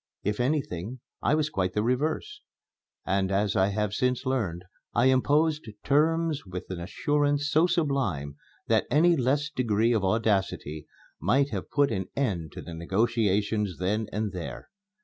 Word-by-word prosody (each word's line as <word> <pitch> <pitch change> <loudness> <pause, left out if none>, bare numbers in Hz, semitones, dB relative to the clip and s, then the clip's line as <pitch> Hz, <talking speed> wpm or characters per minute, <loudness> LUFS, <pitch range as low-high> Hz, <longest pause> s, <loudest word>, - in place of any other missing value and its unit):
If 105 +2 -1
anything, 125 - -1 0.2
I 150 - +3
was 155 -1 0
quite 95 -5 -1
the 105 - 0
reverse; 155 - -1 0.6
and 95 0 +1
as 100 +1 +1
I 95 -1 +4
have 105 0 -1
since 125 +4 0
learned, 105 -10 -1 0.3
I 120 - +4
imposed 145 +2 +2
terms 160 +1 +2
with 90 -1 -6
an 90 - -4
assurance 145 - 0
so 160 +3 +4
sublime 135 - -1 0.3
that - - +2
any 170 +4 +5
less 140 +2 +1
degree 115 -3 +1
of 110 -4 +1
audacity 95 -7 0 0.3
might 140 +1 +2
have 100 -4 -4
put 145 -1 +2
an 95 -1 -2
end 90 - -1
to - - -8
the 85 - -8
negotiations 105 +2 0
then 105 +4 -1
and 105 0 -2
there. 90 -3 -7
115 Hz, 150 wpm, -27 LUFS, 95-145 Hz, 0.6 s, any